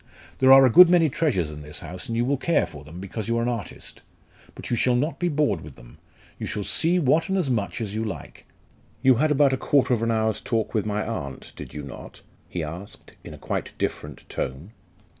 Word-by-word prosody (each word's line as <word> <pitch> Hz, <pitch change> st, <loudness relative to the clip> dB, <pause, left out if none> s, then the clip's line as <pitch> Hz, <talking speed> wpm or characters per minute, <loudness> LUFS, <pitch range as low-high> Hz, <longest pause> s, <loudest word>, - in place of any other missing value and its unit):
There 130 Hz, 0 st, +6 dB
are 135 Hz, 0 st, +9 dB
a -, -, +5 dB
good 180 Hz, +7 st, +9 dB
many 170 Hz, -3 st, +4 dB
treasures 120 Hz, -, 0 dB
in 75 Hz, 0 st, -9 dB
this 75 Hz, +1 st, -6 dB
house, 90 Hz, +1 st, -8 dB
and 115 Hz, -, -3 dB
you 120 Hz, -, +1 dB
will 140 Hz, +3 st, +1 dB
care 165 Hz, +5 st, +1 dB
for 75 Hz, -2 st, -11 dB
them, 80 Hz, +4 st, -11 dB
because 100 Hz, +3 st, -6 dB
you 115 Hz, 0 st, 0 dB
are 115 Hz, -, 0 dB
an -, -, -1 dB
artist. 115 Hz, -7 st, -5 dB, 0.5 s
But -, -, -8 dB
you -, -, +3 dB
shall 125 Hz, +2 st, +2 dB
not 145 Hz, +7 st, -1 dB
be 175 Hz, -, +1 dB
bored 145 Hz, -, +1 dB
with 75 Hz, -3 st, -11 dB
them! -, -, -16 dB, 0.4 s
You -, -, -4 dB
shall 105 Hz, -, -3 dB
see 170 Hz, -, +2 dB
what 160 Hz, +2 st, +2 dB
and 190 Hz, -, +1 dB
as 160 Hz, -8 st, 0 dB
much 105 Hz, -2 st, -2 dB
as 105 Hz, -3 st, -4 dB
you 110 Hz, +1 st, -2 dB
like. 95 Hz, -10 st, -7 dB, 0.6 s
You 130 Hz, -3 st, +5 dB
had 155 Hz, +5 st, +2 dB
about 145 Hz, -2 st, +4 dB
a -, -, 0 dB
quarter 135 Hz, -2 st, +2 dB
of 115 Hz, -, 0 dB
an 115 Hz, -, 0 dB
hour's 110 Hz, -1 st, 0 dB
talk 115 Hz, -3 st, -2 dB
with 110 Hz, -1 st, 0 dB
my 105 Hz, 0 st, -1 dB
aunt, 70 Hz, -, -6 dB
did -, -, -10 dB
you 75 Hz, -, -5 dB
not?" 70 Hz, -2 st, -10 dB, 0.3 s
he 85 Hz, -, -3 dB
asked, 85 Hz, +6 st, -9 dB
in -, -, -9 dB
a -, -, -13 dB
quite -, -, -4 dB
different 75 Hz, -2 st, -4 dB
tone. 70 Hz, +10 st, -5 dB
115 Hz, 235 wpm, -24 LUFS, 90-135 Hz, 0.6 s, are